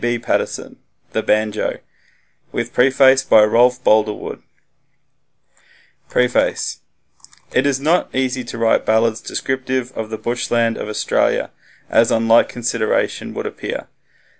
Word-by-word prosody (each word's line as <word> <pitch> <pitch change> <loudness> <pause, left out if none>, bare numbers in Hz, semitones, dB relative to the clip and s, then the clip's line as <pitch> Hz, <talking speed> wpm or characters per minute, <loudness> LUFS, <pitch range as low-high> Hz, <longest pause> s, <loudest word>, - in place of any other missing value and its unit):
B. 120 0 0
Paterson 120 - -3 0.3
("The - - -1
Banjo") 110 0 0 0.7
with - - -4
preface 130 +1 +4
by 110 - +6
Rolf 125 +4 +3
Boldrewood 110 -1 +1 1.7
Preface 125 0 0 0.7
It 130 +3 +2
is 135 -2 0
not 160 +6 +1
so - - -5
easy 130 -1 -1
to 115 - -7
write 115 -1 +2
ballads 110 0 +1
descriptive 130 -1 -3
of 110 -1 -5
the 110 - -5
bushland 115 0 -1
of - - -5
Australia - - 0 0.4
as 115 - +3
on 115 0 +1
light 115 +1 +5
consideration 115 -2 -2
would - - -4
appear. - - -6
120 Hz, 125 wpm, -19 LUFS, 110-130 Hz, 1.7 s, by